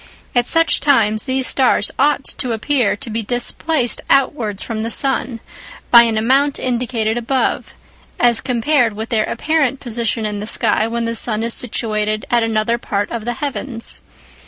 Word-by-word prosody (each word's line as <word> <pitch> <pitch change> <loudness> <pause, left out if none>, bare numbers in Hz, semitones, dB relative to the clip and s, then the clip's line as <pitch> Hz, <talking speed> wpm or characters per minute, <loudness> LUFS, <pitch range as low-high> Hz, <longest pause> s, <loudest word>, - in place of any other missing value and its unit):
At 245 -1 +1
such 330 0 +2
times, 220 -7 +2
these 260 -1 -1
stars 255 -6 +2
ought 285 0 +2
to 250 -3 -3
appear 240 -1 0
to 215 - -5
be 225 +1 -2
displaced 245 +4 0
outwards 235 -7 +1
from 225 -2 -4
the 225 - -3
sun 250 -2 -1 0.5
by 235 - +9
an 225 -2 -1
amount 270 +6 +2
indicated 235 -2 -2
above, 255 +3 -2 0.4
as 240 -2 +3
compared 245 -1 +1
with 220 +2 -6
their 220 -2 +1
apparent 280 0 -1
position 230 -2 -2
in 210 -1 -3
the 210 - -6
sky 220 -1 +1
when 235 0 -3
the 230 - -2
sun 225 -1 +2
is 230 0 0
situated 215 -3 -1
at 240 -1 +3
another 225 +1 0
part 205 -3 -3
of 230 -2 -5
the 240 - -2
heavens. 265 -3 0
235 Hz, 165 wpm, -17 LUFS, 220-260 Hz, 0.5 s, by